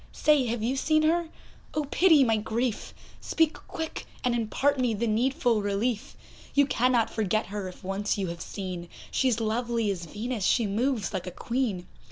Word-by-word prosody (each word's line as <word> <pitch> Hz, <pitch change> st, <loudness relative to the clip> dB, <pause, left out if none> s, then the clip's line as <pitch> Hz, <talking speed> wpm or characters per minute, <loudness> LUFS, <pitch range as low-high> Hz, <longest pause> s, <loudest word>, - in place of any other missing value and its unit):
Say, 295 Hz, -4 st, +3 dB
have 230 Hz, -1 st, -2 dB
you 255 Hz, +4 st, 0 dB
seen 310 Hz, +3 st, +2 dB
her? 330 Hz, +1 st, +2 dB, 0.5 s
oh, 305 Hz, -, +1 dB
pity 325 Hz, -6 st, +6 dB
my 225 Hz, -3 st, +3 dB
grief! 220 Hz, +2 st, -2 dB, 0.3 s
Speak 325 Hz, -1 st, +1 dB
quick, 320 Hz, -1 st, -5 dB, 0.2 s
and 250 Hz, -, +2 dB
impart 260 Hz, +5 st, +1 dB
me 245 Hz, -3 st, +1 dB
the 230 Hz, +3 st, -1 dB
needful 240 Hz, +1 st, +2 dB
relief; 205 Hz, +3 st, -1 dB, 0.4 s
You 285 Hz, 0 st, +6 dB
cannot 250 Hz, -3 st, +2 dB
forget 215 Hz, 0 st, 0 dB
her, 200 Hz, -1 st, -5 dB
if 180 Hz, -, -11 dB
once 195 Hz, +3 st, -1 dB
you 195 Hz, -, -1 dB
have 170 Hz, -1 st, -6 dB
seen, 180 Hz, -3 st, -6 dB, 0.2 s
She's 250 Hz, -4 st, +2 dB
lovely 230 Hz, -1 st, 0 dB
as 175 Hz, -3 st, -5 dB
Venus, 220 Hz, +4 st, -4 dB
she 235 Hz, +4 st, +3 dB
moves 220 Hz, +2 st, 0 dB
like 185 Hz, -1 st, -3 dB
a -, -, -4 dB
Queen. 230 Hz, -5 st, -2 dB
230 Hz, 175 wpm, -27 LUFS, 205-265 Hz, 0.5 s, pity